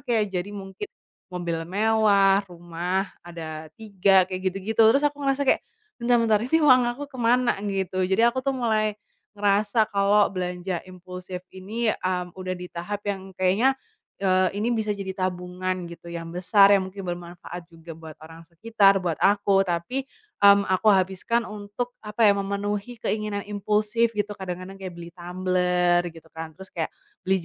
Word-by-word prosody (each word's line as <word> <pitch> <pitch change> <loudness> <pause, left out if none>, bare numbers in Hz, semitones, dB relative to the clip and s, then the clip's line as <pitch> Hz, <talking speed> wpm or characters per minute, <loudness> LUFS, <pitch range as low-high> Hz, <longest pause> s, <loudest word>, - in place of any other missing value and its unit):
kayak 215 -4 0
jadi 180 +1 -2
mungkin 195 - -7 0.4
mobil 175 -2 -3
mewah, 200 -1 +4
rumah 175 +2 -3
ada 160 -2 -8
3 195 -3 +3
kayak 185 0 -5
gitu-gitu. 200 +4 -2
Terus 230 +6 +6
aku 290 0 0
ngerasa 275 0 +1
kayak, 265 - +3 0.4
"Bentar 240 +1 +3
bentar 220 -2 +3
ini 260 +8 +2
uang 255 -3 +7
aku 290 - -5
kemana?" 245 -3 +2
gitu. 190 -1 -2
Jadi 190 +4 +2
aku 240 +2 +2
tuh 270 +1 -1
mulai 215 -3 +1 0.4
ngerasa 205 +2 +2
kalo 200 +1 +3
belanja 180 -1 -3
impulsif 180 0 -8
ini, 215 +4 -2
mmm, 180 -1 -3
udah 185 0 -3
di 180 - -7
tahap 200 +4 -5
yang 195 -2 -4
kayaknya, 205 +9 +2 0.4
eee, 185 -1 +2
ini 225 +4 0
bisa 215 -3 -1
jadi 195 -1 -4
tabungan 185 0 -3
gitu 170 - -12
yang 165 -1 -6
besar 195 +3 +5
yang 190 -2 +3
mungkin 195 +1 -8
bermanfaat 175 0 -7
juga 165 0 -11
buat 160 -1 -11
orang 165 +1 -13
sekitar, 200 +2 +3
buat 170 -3 -2
aku, 200 -1 +3
tapi, 180 +11 -2 0.3
mmm, 200 0 +7
aku 185 +4 +2
habiskan 195 +4 +2
untuk 210 +3 -5
apa 210 +1 0
ya, 205 - +7
memenuhi 205 +4 -3
keinginan 210 -1 -2
impulsif 215 +3 +1
gitu. 210 0 -1
Kadang-kadang 190 0 -7
kayak 185 -2 -6
beli 170 0 -9
tumbler, 180 0 +1
gitu 165 -1 -15
kan, 160 -1 -7
terus 190 +1 -12
kayak 160 -2 -2 0.4
beli 190 -2 +1
195 Hz, 160 wpm, -25 LUFS, 180-215 Hz, 0.4 s, uang